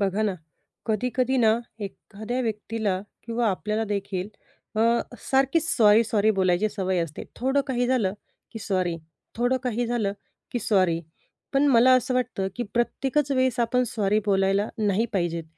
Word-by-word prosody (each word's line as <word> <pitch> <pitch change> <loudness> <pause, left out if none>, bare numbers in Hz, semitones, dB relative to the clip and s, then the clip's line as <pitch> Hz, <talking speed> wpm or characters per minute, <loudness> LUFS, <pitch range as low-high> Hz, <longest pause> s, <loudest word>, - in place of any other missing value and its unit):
बघा 200 +1 +1
ना, 205 -3 0 0.5
कधी-कधी 250 +4 0
ना 220 -3 +5 0.3
एखाद्या 215 +4 -5
व्यक्तीला 215 -3 -2 0.3
किंवा 230 0 0
आपल्याला 210 +3 -1
देखील 200 -2 -3 0.5
अ, - - +2 0.5
सारखीच 275 +5 +2
सॉरी-सॉरी 215 -3 +4
बोलायची 190 0 +2
सवय 190 -3 -1
असते. 155 -2 -9
थोडं 265 +3 +1
काही 245 -2 0
झालं 240 -7 +1 0.4
की 225 - -6
सॉरी, 185 -5 -1 0.4
थोडं 245 +2 +2
काही 245 -1 -1
झालं 230 -4 0 0.4
की 245 - 0
सॉरी. 185 -6 +2 0.5
पण 275 +1 +3
मला 255 0 +6
असं 255 0 -1
वाटतं 245 -6 -1
की 245 - -1
प्रत्येकच 270 +4 0
वेळेस 260 -2 +1
आपण 245 +2 +2
सॉरी 210 -2 +1
बोलायला 195 +1 +2
नाही 210 +1 +1
पाहिजेत. 170 -4 -1
220 Hz, 145 wpm, -25 LUFS, 195-245 Hz, 0.5 s, मला